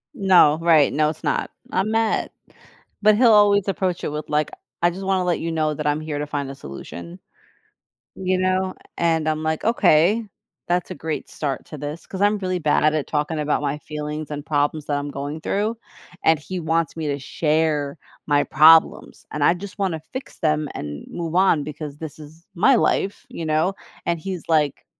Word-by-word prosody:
No, 185 - +5
right, 160 -4 +4
no, 150 +1 +2
it's 155 - -7
not. - - 0 0.2
I'm 190 +4 0
mad, 225 0 +1 0.7
but 215 0 +5
he'll 235 -3 +6
always 205 -1 +5
approach 185 -2 -1
it - - -1
with 150 +1 -5
like, 150 0 0 0.3
"I 175 - +4
just 190 +3 -7
wanna 190 -1 +1
let 175 -1 +1
you 165 0 -3
know 155 -1 0
that 150 0 -3
I'm 150 +1 +1
here 150 -2 -4
to 150 - -3
find 145 -2 -3
a - - -9
solution." 85 - -9 1.0
You 185 0 0
know, 185 0 0 0.2
and 160 -2 +1
I'm 155 0 -2
like, 160 0 -1
"Okay, 210 -1 +4 0.4
that's 175 0 0
a - - -4
great 155 +1 -4
start 140 -4 -4
to 155 - -8
this" 145 +3 -6
'cause 190 - -6
I'm 205 +1 +3
really 185 -2 -2
bad 150 -2 +2
at 155 - +4
it 155 - -2
talking 150 +1 -1
about 150 0 0
my 145 0 -1
feelings 150 0 -5
and 145 0 -5
problems 145 0 0
that 145 - 0
I'm 145 0 -5
going 145 +3 -5
through, 215 +6 -1 0.5
and 160 - +5
he 180 +4 -5
wants 165 0 -1
me 160 -2 -3
to 140 -1 -2
share 150 0 0 0.3
my 145 -1 +3
problems, 160 +2 +4
and 150 - -2
I - - +5
just 200 +3 -9
wanna 180 -5 -1
fix 260 - -7
them 155 -1 +1
and 75 -1 -6
move 170 -1 -4
on 180 -6 +4
because 150 -1 -7
this 160 -1 -8
is 155 +3 -13
my 230 +10 +5
life, 200 -3 0
you 165 - -6
know, 155 +5 +1 0.3
and 170 -1 0
he's 185 -1 -5
like, 150 -4 +1
160 Hz, 195 wpm, -22 LUFS, 150-185 Hz, 1.0 s, he'll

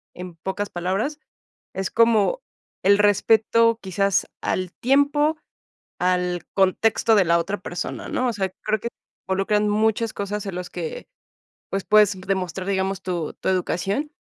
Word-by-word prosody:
en 180 -1 -8
pocas 190 +4 -4
palabras, 195 - -2 0.5
es 190 0 -3
como 230 - +3 0.4
el 200 +1 +5
respeto 225 +2 +3
quizás 195 0 0
al 185 -1 -2
tiempo, 290 +4 +2 0.6
al 180 -1 0
contexto 215 +4 +3
de 200 -3 +4
la 170 0 +3
otra 195 +5 -2
persona, 175 -1 -5
¿no? 255 - 0
O 240 - 0
sea, 190 -3 -1
creo 215 0 0
que 235 - -4 0.4
involucran 210 +2 +1
muchas 220 +1 +1
cosas 205 0 -4
en 195 - -5
las 180 0 -5
que, - - -6 0.6
pues, 195 -1 -2
puedes 205 -3 +4
demostrar, 190 -1 -2
digamos, 190 -1 -1
tu 175 -4 -3
tu - - -5
educación. 190 - -1
200 Hz, 145 wpm, -23 LUFS, 185-225 Hz, 0.6 s, el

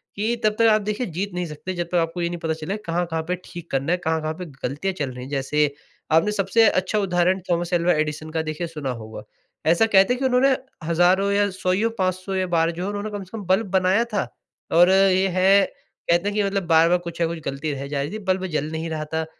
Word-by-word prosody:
कि 220 +4 0
तब 215 0 +2
तक 230 - +5
आप 215 0 +3
देखिए 210 +4 -2
जीत 200 +3 -2
नहीं 180 0 -2
सकते 160 +4 -6
जब 175 0 -2
तक - - -1
आपको 165 +2 -3
ये 170 - 0
नहीं 175 0 -5
पता 160 -1 0
चलेगा 165 +7 -5
कहाँ-कहाँ 165 -1 -1
पे 180 - 0
ठीक 170 -1 -10
करना 135 +4 0
है? 180 - +3
कहाँ-कहाँ 160 -2 -1
पे 180 +3 -7 0.2
गलतियाँ 150 +9 -3
चल 140 -3 -1
रही 125 0 -8
हैं? 130 - -9
जैसे 145 +1 +1 0.4
आपने 165 +7 +4
सबसे 210 +2 +3
अच्छा 185 +3 0
उदाहरण 185 -1 +1
थॉमस 175 0 0
अल्वा 175 0 +3
एडिसन 155 0 -2
का 160 0 -1
देखिए 155 +2 -4
सुना 150 -4 -5
होगा। 110 0 -9 0.5
ऐसा 170 +6 +4
कहते 200 +1 +4
हैं 250 - -4
कि 270 - -1
उन्होंने 260 +1 +4 0.3
हजारों 175 +4 +3
या 205 0 +2
100 185 -1 -1
ईयो, 215 +5 +1
500 185 +1 -1
या 185 -1 0
बार 165 -1 +2
जो 170 +2 -5
है 195 - -2
उन्होंने 205 +1 -4
कम 205 -1 -5
से 190 +5 -9
कम 210 - -6
बल्ब 190 +4 +2
बनाया 190 +3 +3
था। 205 - 0 0.5
और 175 +2 +6
ये 190 0 +4
है 195 +2 +5 0.4
कहते 175 +4 +3
हैं - - -5
कि 210 - +2
मतलब 195 -1 -1
बार-बार 165 +2 +5
कुछ 170 0 -6
ना 165 - +3
कुछ 170 0 -5
गलती 140 +3 -3
रह 140 0 -5
जा 140 -1 -2
रही 145 +3 -3
थी, 215 - -5
बल्ब 190 0 0
जल 155 -3 -2
नहीं 160 +1 -4
रहा 155 -1 -3
था 160 0 0
180 Hz, 250 wpm, -23 LUFS, 160-195 Hz, 0.5 s, और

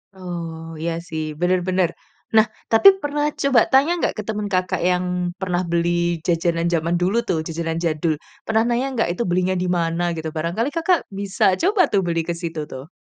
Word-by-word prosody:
Oh, 165 -3 -6
iya 170 +1 -1 0.2
sih, 160 -1 -3 0.2
benar 180 +1 +3
benar. 185 -2 +2 0.5
Nah, 220 0 +7 0.3
tapi 225 +12 +6
pernah 295 0 -1 0.2
coba 275 -3 +4
tanya 275 +5 +5
nggak, - - 0
ke 215 - -3
teman 210 -1 -2
Kakak, 185 -1 0
yang 180 0 +1 0.4
pernah 180 -2 0
beli 170 0 +1 0.4
jajanan, 170 -1 +1
jaman 165 +1 +1
dulu 190 +6 +2
tuh, 165 - +1
jajanan 165 0 -3
jadul. 160 0 +1 0.3
Pernah, 220 0 +2
nanya 245 +3 0
nggak, 225 - +1
"Itu 210 - -2
belinya 185 +1 +1
dimana?" 175 -1 0
Gitu, 160 0 -3
barangkali 175 - -1
Kakak 335 +2 +2 0.2
bisa 200 -1 0 0.2
coba 390 +3 +3
tuh, 200 - +4
beli 165 -1 0
ke 170 - -2
situ, 165 -2 -4
tuh. 130 +4 -9
180 Hz, 180 wpm, -21 LUFS, 165-220 Hz, 0.5 s, Nah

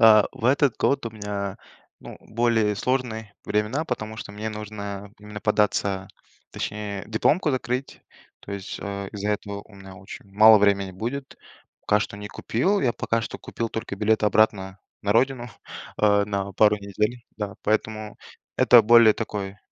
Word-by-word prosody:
Э, 110 -2 +8
в - - -10
этот 135 -1 +3
год 140 -3 +1
у - - -4
меня, 105 -2 -4 0.4
ну, - - -10
более 110 -2 +1
сложные 110 -3 -2
времена, 105 +9 0
потому 110 -5 -4
что 105 - -8
мне 105 +2 -4
нужно 105 -2 -6
именно 105 0 -9
податься, 100 -3 +1 0.4
точнее 105 -1 -5
дипломку 150 - +2
закрыть, 130 0 -3 0.4
то 100 - -9
есть, 100 -1 -6
э, 100 -1 -5
из-за 105 0 -2
этого 100 -1 -3
у 105 - -19
меня 95 -1 -12
очень 95 +1 -11
мало 110 +2 +8
времени 100 -1 +2
будет. 120 +8 -5 0.4
Пока 105 - +2
что 105 - -4
не 105 0 -7
купил, 185 - 0
я 120 - +2
пока 115 0 -1
что - - -6
купил 115 -1 -4
только 110 -3 -5
билет 110 +2 +1
обратно 100 -2 +2 0.2
на 100 0 +1
родину, 125 +1 +1 0.5
э, 105 -1 +4
на 100 -1 -3
пару 105 +2 +4
недель, 105 +4 -2
да. 105 -2 -4
Поэтому 110 0 -1 0.4
это - - +7
более 115 -1 +7
такой, 100 -2 -4
105 Hz, 160 wpm, -24 LUFS, 100-115 Hz, 0.5 s, Э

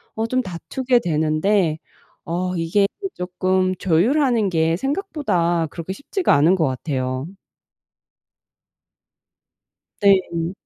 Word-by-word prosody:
어 220 - -1
좀 255 +2 +1
다투게 245 +6 -1
되는데 160 +2 +1 0.5
어 180 +2 -2
이게 175 +4 +2 0.3
쪼끔 185 +1 0
조율하는 230 - +2
게 165 -1 +1
생각보다 210 - -1
그렇게 170 +3 -7
쉽지가 355 - 0
않은 155 +6 +4
것 165 -4 +1
같아요. 130 0 -3 2.8
네. 185 -3 +2
180 Hz, 195 characters per minute, -21 LUFS, 165-210 Hz, 2.8 s, 않은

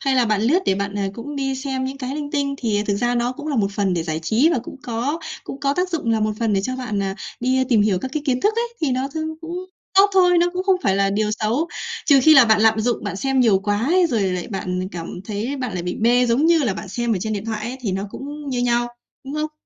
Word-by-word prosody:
Hay 270 -1 +1
là 250 - +4
bạn 215 -2 +1
lướt 285 +10 +4
để - - +3
bạn, 200 +1 -3
à, 195 - 0
cũng 285 +5 -7
đi 270 -1 -1
xem 265 -1 -3
những 270 +1 -5
cái 260 +1 -4
linh 295 -1 -4
tinh 280 -2 -1
thì 210 -5 0
thực 200 - +1
ra 240 +3 0
nó 240 +1 0
cũng 295 +3 -9
là 295 -3 -1
một 200 -3 +1
phần 195 -2 0
để 170 - -1
giải 160 -1 -3
trí 225 - +3
và - - +1
cũng 275 - -9
có 250 +5 -2 0.3
cũng 275 - -7
có 280 0 +1
tác 360 +2 0
dụng 310 -9 -1
là 220 -1 +2
một 215 - +1
phần 225 -2 +1
để 195 - +2
cho 255 +5 -3
bạn, 220 -6 -3
ờ, 195 -1 -2 0.3
đi 260 +1 +2
tìm 225 -5 +4
hiểu 200 -4 +2
các 260 - -5
cái 305 - -1
kiến 255 -1 +1
thức 425 +7 +2
ấy, 470 0 -2
thì 305 -4 +1
nó 260 +2 -1
trông 315 0 -2 0.2
cũng 335 +1 -6 0.4
tốt 400 +1 +6
thôi, 360 -2 +5
nó 345 - +4
cũng 365 0 -2
không 385 -1 +3
phải 195 - +2
là 195 0 +2
điều 210 +1 0
xấu. 225 +10 -1 0.4
Trừ 280 -3 +6
khi 315 +2 +7
là 265 -4 +9
bạn 220 -2 +4
lạm 220 0 +4
dụng, 235 0 -1
bạn 200 -1 -3
xem 270 +4 +1
nhiều 220 -6 +4
quá 205 +2 -1
ấy, 355 +3 +4
rồi 230 -10 0
lại 180 -2 -2
bạn 185 -2 -3
cảm 165 -1 -5 0.2
thấy 220 +7 -3
bạn 255 -6 -3
lại 175 - -3
bị 180 0 -3
mê 245 +2 +3
giống 245 +7 +2
như 335 0 +5
là 240 -10 0
bạn 195 - -7
xem 235 +3 -1
ở 205 - 0
trên 220 +1 -2
điện 205 0 -3
thoại 220 -2 -3
ấy 245 +3 -4
thì 215 -6 -2
nó 190 +1 -2
cũng 290 +1 -7
như 245 -2 -1
nhau, 240 0 +1 0.4
đúng 270 +2 -6
không? 305 0 -2
245 Hz, 295 wpm, -21 LUFS, 210-280 Hz, 0.4 s, là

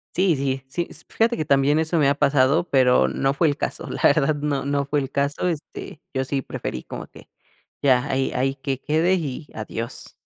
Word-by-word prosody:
Sí, 185 -3 +3
sí, 135 -1 -2
sí, 170 +6 -3
esp - - -8
f - - -13
fíjate 230 +1 +3
que 155 - -2
también 140 +1 +3
eso 160 +1 +1
me 140 -2 +4
ha 140 - +2
pasado, 140 +4 +3
pero, 125 - +4
no 135 - 0
fue 160 - +3
el 145 - 0
caso, - - -3
la - - -5
verdad 145 +3 +4
no 145 -1 -2
no 140 0 0
fue 145 +1 0
el 135 - -5
caso, 140 +5 0
este, 160 -2 -5
yo 130 0 0
sí 135 +1 -1
preferí 65 - -5
como - - -7
que - - -16 0.5
ya, 130 -2 +4
ahí 135 -2 0
ahí 135 +1 +1
que 135 0 -3
quede 160 +5 +2
y 150 -4 -4
adiós. 115 +1 -6
140 Hz, 215 wpm, -23 LUFS, 135-155 Hz, 0.5 s, me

